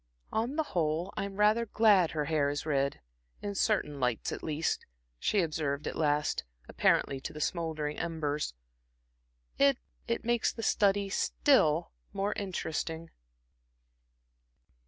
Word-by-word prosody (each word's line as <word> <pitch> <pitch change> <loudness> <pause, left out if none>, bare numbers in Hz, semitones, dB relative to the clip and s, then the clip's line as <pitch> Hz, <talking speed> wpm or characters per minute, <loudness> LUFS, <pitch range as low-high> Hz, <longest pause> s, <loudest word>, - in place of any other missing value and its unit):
"On 235 +6 -1
the 315 - +1
whole, 165 +1 0
I'm 200 0 -3
rather 215 +3 +3
glad 205 -6 +5
her 150 -2 -2
hair 145 -2 +1
is 145 +1 -3
red 140 - 0 0.4
in 205 -1 -2
certain 190 -8 0
lights 125 -3 0
at - - -5
least," 155 +1 -1 0.4
she 205 - +2
observed 150 -3 -2
at - - -3
last, 150 - +1 0.2
apparently 135 -1 +2
to - - -5
the 150 - -8
smouldering 155 -2 -2
embers. 150 - -2 1.0
"It 275 -2 +5 0.3
it 235 -1 -2
makes 240 -1 +2
the 225 - -7
study 200 -1 +2
still 170 - +3 0.2
more 200 +1 0
interesting." 165 -4 -4
165 Hz, 130 wpm, -31 LUFS, 150-205 Hz, 1.0 s, glad